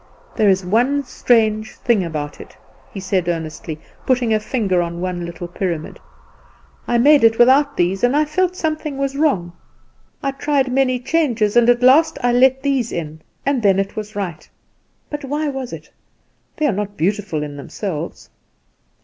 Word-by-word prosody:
"There 210 Hz, -2 st, +3 dB
is 190 Hz, -1 st, +2 dB
one 250 Hz, +9 st, +2 dB
strange 220 Hz, -4 st, +1 dB
thing 230 Hz, -6 st, +1 dB
about 150 Hz, -3 st, -5 dB
it," -, -, -14 dB, 0.3 s
he 195 Hz, -, -7 dB
said 185 Hz, -2 st, -1 dB
earnestly, 160 Hz, -1 st, -4 dB, 0.2 s
putting 250 Hz, -3 st, +1 dB
a 215 Hz, -, +2 dB
finger 210 Hz, -5 st, 0 dB
on 170 Hz, 0 st, -4 dB
one 175 Hz, -1 st, -3 dB
little 170 Hz, 0 st, -7 dB
pyramid. 175 Hz, -3 st, -4 dB, 0.9 s
"I 240 Hz, -, +2 dB
made 285 Hz, +2 st, +5 dB
it 225 Hz, 0 st, +5 dB
without 280 Hz, +4 st, +4 dB
these, 185 Hz, +4 st, 0 dB
and 245 Hz, +3 st, +3 dB
I 305 Hz, -, +3 dB
felt 365 Hz, +4 st, 0 dB
something 310 Hz, -4 st, -3 dB
was 275 Hz, 0 st, -2 dB
wrong; 200 Hz, -, 0 dB, 0.7 s
I 275 Hz, -, 0 dB
tried 275 Hz, -1 st, 0 dB
many 255 Hz, -1 st, +2 dB
changes, 245 Hz, -7 st, 0 dB
and 240 Hz, 0 st, +5 dB
at 245 Hz, 0 st, +3 dB
last 315 Hz, +5 st, +5 dB
I 245 Hz, 0 st, +3 dB
let 265 Hz, +2 st, +4 dB
these 270 Hz, -5 st, 0 dB
in, 155 Hz, -2 st, -5 dB, 0.2 s
and 275 Hz, -3 st, +1 dB
then 195 Hz, -3 st, +3 dB
it 195 Hz, +1 st, -2 dB
was 215 Hz, -1 st, -6 dB
right. 180 Hz, -6 st, -5 dB, 0.6 s
But 295 Hz, 0 st, -5 dB
why 295 Hz, +2 st, -2 dB
was 265 Hz, -3 st, -5 dB
it? -, -, -9 dB, 0.7 s
They 310 Hz, -, 0 dB
are 290 Hz, -, +3 dB
not 205 Hz, +1 st, -4 dB
beautiful 185 Hz, -3 st, -1 dB
in 145 Hz, -1 st, -7 dB
themselves." 165 Hz, +3 st, -6 dB
230 Hz, 170 wpm, -19 LUFS, 185-275 Hz, 0.9 s, made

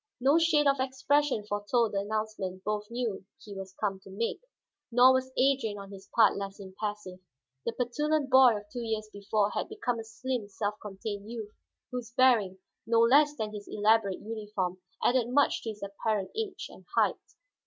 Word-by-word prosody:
No 275 Hz, +6 st, +4 dB
shade 320 Hz, -3 st, +3 dB
of 275 Hz, -1 st, +3 dB
expression 265 Hz, -2 st, +1 dB
foretold 210 Hz, +2 st, 0 dB
the 195 Hz, -, +1 dB
announcement 205 Hz, -3 st, -3 dB
both 210 Hz, 0 st, -2 dB
knew 235 Hz, -5 st, -3 dB, 0.2 s
he 205 Hz, -, -10 dB
was 190 Hz, -1 st, -8 dB
come 195 Hz, -2 st, -1 dB
to 195 Hz, -, -15 dB
make, 215 Hz, +4 st, -3 dB, 0.5 s
nor 250 Hz, +2 st, +7 dB
was 260 Hz, 0 st, 0 dB
Adrian 255 Hz, -6 st, +2 dB
on 200 Hz, 0 st, -9 dB
his 195 Hz, 0 st, -12 dB
part 225 Hz, -3 st, +6 dB
less 195 Hz, 0 st, -5 dB
impassive. 195 Hz, -1 st, -6 dB, 0.5 s
The 230 Hz, -, 0 dB
petulant 285 Hz, +4 st, 0 dB
boy 255 Hz, -4 st, +7 dB
of 205 Hz, -, -8 dB
two 245 Hz, -, -4 dB
years 220 Hz, -1 st, -2 dB
before 205 Hz, 0 st, 0 dB
had -, -, -3 dB
become 260 Hz, -, -2 dB
a -, -, -5 dB
slim, 235 Hz, 0 st, -4 dB
self 205 Hz, +1 st, -2 dB
contained 205 Hz, +1 st, -6 dB
youth, 220 Hz, -3 st, -6 dB, 0.4 s
whose 245 Hz, -2 st, -5 dB
bearing, 225 Hz, -8 st, +4 dB, 0.3 s
no 230 Hz, 0 st, +3 dB
less 290 Hz, +5 st, +5 dB
than 215 Hz, -5 st, -4 dB
his 205 Hz, -1 st, -8 dB
elaborate 210 Hz, -2 st, +2 dB
uniform, 210 Hz, -4 st, -4 dB, 0.2 s
added 245 Hz, -1 st, +3 dB
much 285 Hz, +3 st, +3 dB
to 225 Hz, -, -5 dB
his 210 Hz, -2 st, -7 dB
apparent 200 Hz, 0 st, -2 dB
age 440 Hz, -3 st, -3 dB
and -, -, -14 dB
height. -, -, +2 dB
220 Hz, 175 wpm, -29 LUFS, 205-255 Hz, 0.5 s, nor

